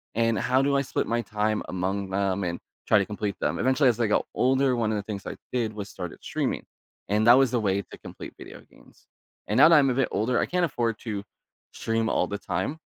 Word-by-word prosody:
and 115 0 +2
how 130 +3 +2
do 140 0 +2
I 140 - +3
split 135 - -2
my 120 +1 0
time 105 0 -1
among 95 +2 -2
them 100 0 0
and 85 -1 -3 0.3
try - - +5
to 100 - 0
complete 105 -1 -3
them? - - -1
Eventually, 130 +1 +3
as 120 - -1
I 115 - +2
got 105 - +1
older, 130 0 +2
one 115 -2 0
of - - 0
the 100 - -3
things 100 -1 -6
I - - -5 0.2
did 115 -4 -1
was 105 -1 -6
started 90 -2 -7
streaming, - - -2 0.5
and 105 +2 +2
that 120 - +10
was 135 -3 +3
a 120 - +2
way 100 -2 0
to - - -13
complete - - -10
video - - -11
games, - - -22 0.4
and 105 - 0
now 140 - +9
that 165 - +7
I'm 140 -3 +5
a - - +1
bit 135 -1 +2
older, 120 +4 +1
I - - +2
can't 180 -1 +1
afford 120 -7 -1
to 105 -4 -5 0.5
stream 115 0 -1
all - - +1
the 100 - -4
time, 95 - -3
110 Hz, 240 wpm, -26 LUFS, 100-125 Hz, 0.5 s, that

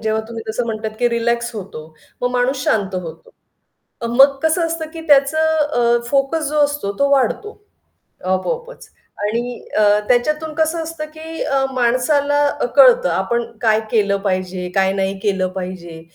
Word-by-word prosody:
जेव्हा 220 0 0
तुम्ही 230 -1 -6
तसं 235 +3 -1
म्हणतात, 220 -1 -3
की 240 - +3
रिलॅक्स 235 0 -1
होतो, 185 -7 -8 0.4
मग 245 - +1
माणूस 250 +2 0
शांत 195 -3 0
होतो. 165 -3 -7 0.7
अ, - - -1
मग 270 +4 +5
कसं 320 +2 +2
असतं 325 -1 -4
की 330 - -7
त्याचं 280 +1 +4
अ, 295 -7 +2
फोकस 280 +3 +1
जो 300 +1 -1
असतो, 285 -9 -2
तो 280 - +3
वाढतो. 280 - +1 0.7
आपोआपच. 470 - -3 0.3
आणि 235 +3 -2 0.2
अ, - - +4 0.3
त्याच्यातून 305 +6 +1
कसं 320 +1 0
असतं, 320 -1 -6
की 320 +1 -6
अ, 275 -2 +1
माणसाला 280 +4 +2 0.2
अ, - - +1
कळतं - - +6
आपण 235 0 -1 0.2
काय 220 -2 +3
केलं 200 -3 +2
पाहिजे, 185 -2 -2
काय 190 0 +2
नाही 195 0 -1
केलं 190 -2 0
पाहिजे. 175 -3 -7
245 Hz, 155 wpm, -19 LUFS, 210-305 Hz, 0.7 s, कळतं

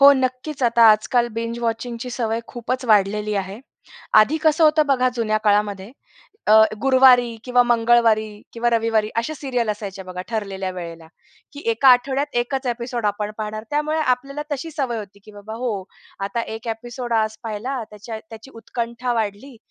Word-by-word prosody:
हो, 280 +1 +9
नक्कीच 260 +2 -2
आता 235 -1 +4
आजकाल 235 +3 +2
बिंज 230 +1 -3
वॉचिंग 235 +1 -3
ची 250 - -5
सवय 230 -2 -2
खूपच 250 +2 -4
वाढलेली 210 -1 +2
आहे. 195 +2 -4 0.5
आधी 215 +8 +6
कसं 315 +1 +4
होतं 305 0 +4
बघा 255 -2 +3
जुन्या 215 -2 0
काळामध्ये, 205 -1 +1 0.6
अ, - - +4 0.3
गुरुवारी 255 -3 +5
किंवा 250 -1 +4
मंगळवारी 235 -2 +3 0.3
किंवा 240 +1 0
रविवारी 225 -2 +1
अशा 235 +7 -1
सीरियल 250 -6 -2
असायचे 200 -2 -6
बघा 185 -1 -7
ठरलेल्या 195 -4 -3
वेळेला, 170 -2 -8 0.5
की 285 - -9
एका 230 +4 +4
आठवड्यात 265 +2 +3
एकच 265 +2 -4
एपिसोड 240 -1 -2
आपण 205 0 -2
पाहणार. 215 0 -5
त्यामुळे 300 +1 0
आपल्याला 275 +1 -1
तशी 290 +4 -4
सवय 265 -6 -2
होती 200 -1 -10
की 215 - -14
बाबा 205 +1 -9
हो, 240 - 0 0.5
आता 200 +4 -2 0.2
एक 230 +1 -9
एपिसोड 240 +2 -5
आज 220 -1 +1
पाहिला, 230 +4 -4
त्याच्या 210 +2 -8
त्याची 225 +4 -11
उत्कंठा 235 +2 -4
वाढली. 225 +4 -3
235 Hz, 160 wpm, -21 LUFS, 215-255 Hz, 0.6 s, हो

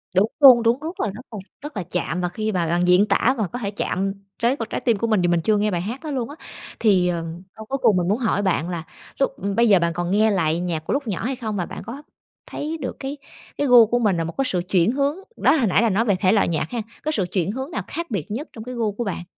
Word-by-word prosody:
Đúng 205 +4 +3
luôn, 255 -5 +8
đúng 235 +3 +2
rất 325 +4 -7
là 210 - 0
rất 210 +5 -8
là 215 - -6 0.2
rất 295 -4 -8
là 190 - -2
chạm, 180 0 -3
và 180 - -1
khi 215 +4 -3
mà 175 -4 0
bạn 175 +2 +1
diễn 180 +3 +5
tả 230 +5 +2
mà 215 -4 0
có 245 - -6
thể 200 -4 -3
chạm 195 -1 -2 0.3
tới 240 +3 +2
một 225 0 -4
trái - - -3
tim 235 -4 +2
của 230 - -1
mình, 215 -4 +2
thì 175 - +2
mình 175 -1 +2
chưa 215 +5 +2
nghe 210 +1 +1
bài 175 -2 -1
hát 235 - -5
đó 310 - -4
luôn 255 -3 -2
á. 290 - -9 0.4
Thì, 190 -5 +3
ờm, 170 -1 -3
câu 220 - -9
cuối 270 +5 -2
cùng 200 - +4
mình 175 -1 0
muốn 205 +4 +2
hỏi 225 -5 0
bạn 180 -3 0
là 170 -3 -4 0.4
lúc 275 - +2 0.2
bây 235 0 +4
giờ 195 -3 +6
bạn 170 0 0
còn 175 +1 -2
nghe 215 +2 +3
lại 165 -4 +1
nhạc 170 -3 -2
của - - -1
lúc 280 -3 -2
nhỏ 200 - -3
hay 265 +2 -1
không? 220 -4 -4
Và 180 - -1
bạn - - -8
có 260 +7 -8 0.5
thấy 315 +2 -4
được 255 - -4
cái 275 +2 -5 0.4
cái 290 - 0
gu 245 -2 +8
của 240 +3 +1
mình 210 -6 +2
là 165 - 0
một 165 +1 -5
cái 270 - +1
sự 185 -8 0
chuyển 180 +2 +3
hướng? 280 +3 0 0.2
Đó, - - +4
hồi 260 -8 +2
nãy 190 - +3
là 230 - +3
nói 215 +4 +1
về 205 -4 +2
thể 185 0 +2
loại 210 -3 +3
nhạc 160 -2 -1
hen, 240 -2 -2 0.2
có 310 - -1
sự 205 -11 0
chuyển 185 -1 0
hướng 265 +7 -5
nào - - -2
khác 335 +1 -5
biệt 195 -4 -3
nhất 270 +9 -4
trong 220 - -8
cái 250 +2 -7
gu 225 -3 0
của 205 +4 -4
bạn? 190 -5 -4
215 Hz, 300 wpm, -22 LUFS, 180-245 Hz, 0.5 s, luôn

